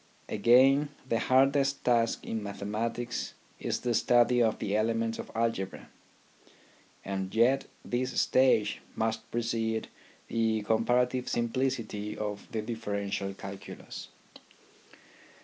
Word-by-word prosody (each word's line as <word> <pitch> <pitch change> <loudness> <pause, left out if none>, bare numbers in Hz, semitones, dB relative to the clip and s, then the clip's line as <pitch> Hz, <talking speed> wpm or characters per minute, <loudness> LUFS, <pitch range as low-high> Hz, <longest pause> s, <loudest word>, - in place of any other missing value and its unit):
Again, 130 +7 +5 0.2
the 115 -3 +1
hardest 135 +2 +3
task 115 -2 +2
in 110 - -3
mathematics 110 +4 -3 0.2
is - - -2
the 120 -1 0
study 120 +2 +4
of 110 -2 +2
the 100 - -2
elements 115 +1 0
of - - -6
algebra, 115 -5 -2 1.2
and 95 0 -3
yet 125 +4 +3 0.2
this 125 +1 -1
stage 120 -5 +3
must 110 0 -2
precede 115 -1 -1 0.4
the 110 -2 +1
comparative 125 +3 +1
simplicity 115 -3 -1
of 105 -1 -5
the 110 -2 -2
differential 100 -3 -3
cal 95 0 -7
culus. - - -9
115 Hz, 110 wpm, -30 LUFS, 105-125 Hz, 1.2 s, Again